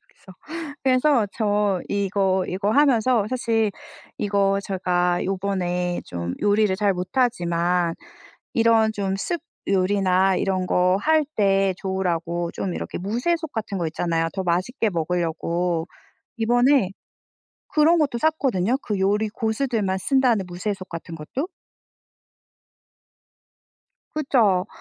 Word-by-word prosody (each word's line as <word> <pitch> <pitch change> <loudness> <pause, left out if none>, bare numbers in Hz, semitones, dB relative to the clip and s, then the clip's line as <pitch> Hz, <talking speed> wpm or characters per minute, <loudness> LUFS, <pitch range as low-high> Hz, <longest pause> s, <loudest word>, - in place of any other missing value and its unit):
여기서. 190 - -18 0.5
그래서 255 -3 +3
저 205 -4 +1
이거 195 -2 +1
이거 200 +3 -1
하면서 255 -5 +3
사실 225 -4 0 0.5
이거 200 -1 +1
제가 180 -2 0
요번에 185 -2 -1
좀 85 0 -4
요리를 205 -1 +3
잘 200 0 +1
못하지만 180 -4 0 0.6
이런 225 -1 +4
좀 195 -2 -2
soup 315 - -3 0.3
요리나 190 -1 +2
이런 185 -2 -1
거 180 +1 +3
할 315 -1 +3
때 195 -2 +3
좋으라고 175 -3 -2
좀 185 -3 -3
이렇게 - - -5
무쇠솥 290 - -1
같은 215 -3 -3
거 170 -2 -1
있잖아요 165 0 -1
더 190 -1 -3
맛있게 185 +7 0
먹으려고. 170 0 -1 0.5
이번에 245 -1 +3 0.8
그런 315 +3 +4
것도 275 -6 +1
샀거든요 260 - +1
그 205 -3 -2
요리 205 +3 +2
고수들만 220 -3 -1
쓴다는 245 -4 +2
무쇠솥 185 +2 -4
같은 170 0 -7
것도. 250 - -4 2.7
그쵸. 225 -11 +2
195 Hz, 250 characters per minute, -23 LUFS, 180-230 Hz, 2.7 s, 이런